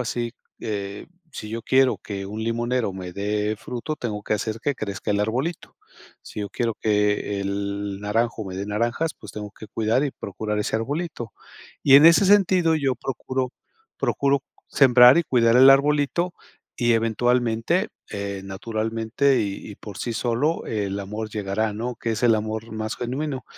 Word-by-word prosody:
así, 120 Hz, -1 st, -2 dB, 0.3 s
eh, 100 Hz, -2 st, -4 dB, 0.3 s
si 105 Hz, -, -7 dB
yo 115 Hz, +1 st, -5 dB
quiero 130 Hz, +1 st, +3 dB
que 100 Hz, -2 st, -6 dB
un 105 Hz, +3 st, -5 dB
limonero 120 Hz, -1 st, -1 dB
me 90 Hz, -1 st, -7 dB
dé 105 Hz, +2 st, -1 dB
fruto, 125 Hz, +7 st, -5 dB
tengo 105 Hz, -5 st, -4 dB
que -, -, 0 dB
hacer 110 Hz, +1 st, -3 dB
que 145 Hz, +4 st, 0 dB
crezca 105 Hz, -3 st, -4 dB
el 100 Hz, -, +1 dB
arbolito. 130 Hz, +11 st, -2 dB, 0.5 s
Si -, -, -8 dB
yo 100 Hz, -, -3 dB
quiero 115 Hz, -2 st, -1 dB
que 105 Hz, -1 st, +1 dB
el 100 Hz, 0 st, -3 dB
naranjo 110 Hz, +2 st, -1 dB
me 95 Hz, -1 st, -6 dB
dé 100 Hz, +1 st, -4 dB
naranjas, 120 Hz, +10 st, -1 dB
pues, 105 Hz, -, -11 dB
tengo 105 Hz, -1 st, -6 dB
que 110 Hz, -, -11 dB
cuidar 115 Hz, +5 st, +1 dB
y 145 Hz, -, -1 dB
procurar 105 Hz, -1 st, -4 dB
ese 105 Hz, -, 0 dB
arbolito. 140 Hz, 0 st, -4 dB, 0.5 s
Y 135 Hz, -, +6 dB
en 145 Hz, -, +7 dB
ese 170 Hz, +4 st, +7 dB
sentido, 185 Hz, -4 st, +4 dB
yo 135 Hz, -4 st, 0 dB
procuro 130 Hz, +1 st, -3 dB, 0.5 s
procuro 140 Hz, 0 st, +1 dB, 0.3 s
sembrar 125 Hz, -1 st, +7 dB
y -, -, +3 dB
cuidar 115 Hz, -4 st, +3 dB
el 130 Hz, +2 st, +9 dB
arbolito, 145 Hz, +5 st, +3 dB, 0.4 s
y 120 Hz, -1 st, +2 dB
eventualmente, 120 Hz, -, +1 dB, 0.2 s
eh, 100 Hz, -1 st, -4 dB
naturalmente, 110 Hz, +6 st, 0 dB
y 100 Hz, 0 st, -4 dB
y -, -, -8 dB
por 105 Hz, -3 st, -10 dB
sí 120 Hz, -, -3 dB
solo, 120 Hz, +8 st, 0 dB
el 100 Hz, -2 st, -2 dB
amor 105 Hz, +2 st, -5 dB
llegará, 105 Hz, +1 st, -1 dB
¿no?, 120 Hz, +3 st, -4 dB
que 115 Hz, 0 st, -2 dB
es 110 Hz, -, -4 dB
el 120 Hz, -2 st, +5 dB
amor 110 Hz, +1 st, -4 dB
más 110 Hz, 0 st, -3 dB
genuino. 130 Hz, +2 st, -3 dB
115 Hz, 170 wpm, -24 LUFS, 105-130 Hz, 0.5 s, el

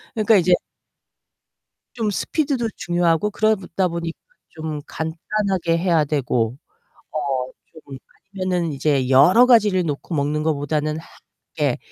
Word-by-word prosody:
그러니깐 215 Hz, -1 st, +4 dB
이제 180 Hz, 0 st, +3 dB, 1.4 s
좀 225 Hz, -4 st, -1 dB
스피드도 270 Hz, -, -1 dB
중요하고 175 Hz, +2 st, +1 dB
그러다 195 Hz, -4 st, 0 dB
보니 170 Hz, -1 st, -4 dB, 0.4 s
좀 155 Hz, -2 st, -6 dB
간단하게 170 Hz, +2 st, -2 dB
해야 170 Hz, -3 st, +2 dB
되고 125 Hz, -5 st, -1 dB, 0.6 s
어 135 Hz, -4 st, -2 dB, 0.3 s
좀 135 Hz, -2 st, -9 dB, 0.4 s
아니면은 180 Hz, -4 st, -1 dB
이제 140 Hz, -2 st, 0 dB
여러 175 Hz, -, +6 dB
가지를 210 Hz, -7 st, +4 dB
놓고 150 Hz, +3 st, -4 dB
먹는 150 Hz, +1 st, 0 dB
것 160 Hz, 0 st, +1 dB
보다는 150 Hz, +2 st, -2 dB
하 160 Hz, -, -11 dB, 0.5 s
이게 -, -, 0 dB
165 Hz, 265 characters per minute, -21 LUFS, 150-195 Hz, 1.4 s, 여러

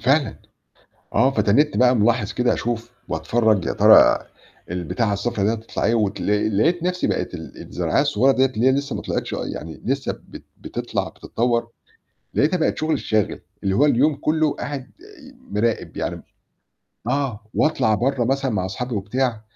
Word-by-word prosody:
فعلًا. 135 Hz, +5 st, +2 dB, 0.8 s
آه. 130 Hz, -, +4 dB
فتنّيتني 135 Hz, +5 st, +2 dB
بقى 125 Hz, 0 st, +5 dB
ملاحظ 110 Hz, 0 st, +2 dB
كده 125 Hz, -1 st, +1 dB
أشوف 120 Hz, 0 st, -3 dB, 0.2 s
واتفرج 110 Hz, -5 st, +1 dB
يا -, -, -1 dB
ترى -, -, +7 dB, 0.5 s
البتاعة 90 Hz, +5 st, -1 dB
الصفرا 100 Hz, 0 st, -1 dB
دي 110 Hz, -, +2 dB
هتطلَع 115 Hz, 0 st, -5 dB
إيه 115 Hz, -, +3 dB
واتل 105 Hz, -1 st, 0 dB
لقيت 170 Hz, +8 st, +2 dB
نفْسي 180 Hz, 0 st, 0 dB
بقت -, -, -2 dB
ال -, -, -9 dB
الزرعاية -, -, 0 dB
الصغيّرة 130 Hz, +6 st, +3 dB
ديّة 130 Hz, 0 st, +3 dB
اللي 125 Hz, -2 st, -1 dB
هي 130 Hz, -, +6 dB
لسّه 140 Hz, +1 st, -2 dB
ما -, -, -5 dB
طلْعتش -, -, -3 dB
آه -, -, -3 dB
يعني 80 Hz, 0 st, -7 dB
لسّه 135 Hz, +2 st, -1 dB, 0.2 s
بت -, -, -11 dB, 0.2 s
بتطلَع -, -, -3 dB
بتتطوّر، 115 Hz, 0 st, -1 dB, 0.7 s
لقيتها 170 Hz, +5 st, +2 dB
بقت 160 Hz, -, 0 dB
شغلي 155 Hz, +1 st, 0 dB
الشاغل، 110 Hz, -2 st, -1 dB, 0.2 s
اللي 95 Hz, -1 st, +1 dB
هو 140 Hz, -, +5 dB
اليوم 145 Hz, +2 st, +3 dB
كلّه 155 Hz, 0 st, +1 dB
قاعد 135 Hz, -1 st, -6 dB, 0.6 s
مراقب 110 Hz, +2 st, -1 dB
يعني -, -, -3 dB, 0.9 s
آه، 135 Hz, -4 st, -1 dB
واطلَع 110 Hz, -8 st, +2 dB
برّه 125 Hz, +3 st, 0 dB
مثلًا 135 Hz, 0 st, 0 dB
مع 95 Hz, -3 st, -1 dB
أصحابي 120 Hz, +5 st, -4 dB
وبتاع 115 Hz, +3 st, -1 dB
120 Hz, 160 wpm, -22 LUFS, 105-135 Hz, 0.9 s, ترى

